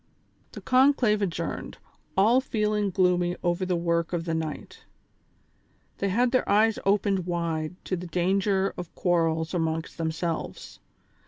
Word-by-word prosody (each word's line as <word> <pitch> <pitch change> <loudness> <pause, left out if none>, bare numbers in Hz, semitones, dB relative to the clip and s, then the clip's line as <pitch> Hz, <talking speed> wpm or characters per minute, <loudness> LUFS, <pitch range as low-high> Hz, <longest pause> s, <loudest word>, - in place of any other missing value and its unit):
The - - -8
conclave 255 -5 +3
adjourned, 170 -4 -3 0.4
all 225 +7 +5
feeling 210 -4 0
gloomy 180 -1 +2
over 175 +1 0
the 180 - +1
work 170 0 0
of 170 -1 -2
the 165 - -2
night. 160 -2 -5 1.2
They 200 - 0
had 240 +5 +2
their 255 - +1
eyes 215 +2 +3
opened 195 -2 +1
wide 170 -1 -2
to 185 - -1
the 180 0 -6
dan 180 +3 +1
ger 195 -1 +1
of 175 -2 -8
quarrels 165 -2 +1
amongst 165 -1 -2
themselves. 165 0 -4
180 Hz, 140 wpm, -26 LUFS, 170-205 Hz, 1.2 s, all